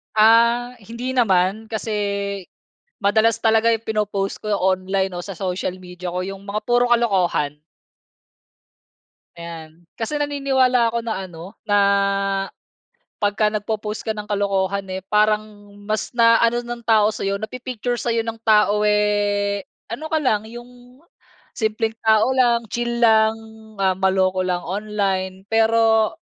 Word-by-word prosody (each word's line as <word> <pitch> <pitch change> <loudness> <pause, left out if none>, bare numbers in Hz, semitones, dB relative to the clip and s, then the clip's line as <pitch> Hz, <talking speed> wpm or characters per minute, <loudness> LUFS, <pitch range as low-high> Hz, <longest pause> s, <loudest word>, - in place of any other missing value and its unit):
Ah, 235 +3 +4
hindi 235 +5 -6
naman 215 -3 +1
kasi 220 0 -4 1.1
madalas 220 +2 +2
talaga 225 0 +3
yung 225 - 0
pinoppost 210 -2 -2
ko 215 -1 -2
online 190 0 0
o 175 - -5
sa 195 - -6
social 185 -1 -3
media 180 -1 -7
ko 180 - -2
yung 195 +1 -6
mga 205 +1 -3
puro 245 0 +3
kalokohan. 180 -11 +1 1.8
Ayan, 170 -1 -10
kasi 230 +6 -3
naniniwala 265 -4 +2
ako 235 - 0
na 230 - -2
ano 165 -1 -11 0.2
na 205 -1 +3 1.4
'pagka 210 0 +1
nagpo-post 210 0 -4
ka 220 - -1
ng 210 -1 -8
kalokohan, 200 -1 0
eh, 190 - -4
parang 210 0 +3 0.5
mas 215 +3 -2
na 230 -1 +5
ano 235 +1 +2
ng 240 -1 -8
tao 215 -2 +4
sa'yo 200 -2 -3
napi-picture 245 +1 -4
sa'yo 230 -1 0
ng 225 0 -5
tao, 210 -1 +4
eh, 205 -1 +1 0.2
ano 255 +7 -5
ka 315 0 0
lang 215 -5 +1
yung 245 +3 -13 0.6
simpleng 220 0 -1
tao 220 +2 +4
lang, 235 -3 +2
chill 240 +1 -2
lang, 220 -1 +5 0.5
ah, 190 -1 +2
maloko 190 -1 +1
lang 180 -1 -1
online. 190 -1 -2
Pero 225 0 +3
215 Hz, 130 wpm, -21 LUFS, 195-230 Hz, 1.8 s, na